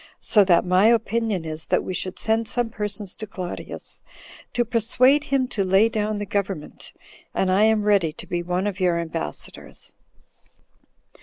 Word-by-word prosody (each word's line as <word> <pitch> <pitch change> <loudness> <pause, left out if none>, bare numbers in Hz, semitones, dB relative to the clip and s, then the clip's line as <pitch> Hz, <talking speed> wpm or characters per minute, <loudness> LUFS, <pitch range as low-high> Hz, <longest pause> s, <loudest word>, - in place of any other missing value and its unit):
So 210 - +4
that 175 -2 +4
my 185 +3 +4
opinion 225 -5 +1
is, 155 0 -5
that - - +1
we 185 - -4
should 185 0 -3
send 225 0 0
some 240 -1 -1
persons 210 -3 -4
to 215 - -6
Claudius, 185 -3 -7 0.5
to 240 - 0
persuade 250 +5 +3
him 270 -2 +1
to 210 -5 -1
lay 195 +4 +4
down 215 -1 -1
the 205 - -3
government; 195 -5 -4 0.4
and 185 - +1
I 200 +3 +4
am 220 -1 +3
ready 200 -6 +3
to - - -9
be 175 -1 -2
one 180 +2 -2
of 205 -1 -3
your 180 -2 +2
ambassadors." 160 - -6
205 Hz, 165 wpm, -23 LUFS, 180-225 Hz, 0.5 s, So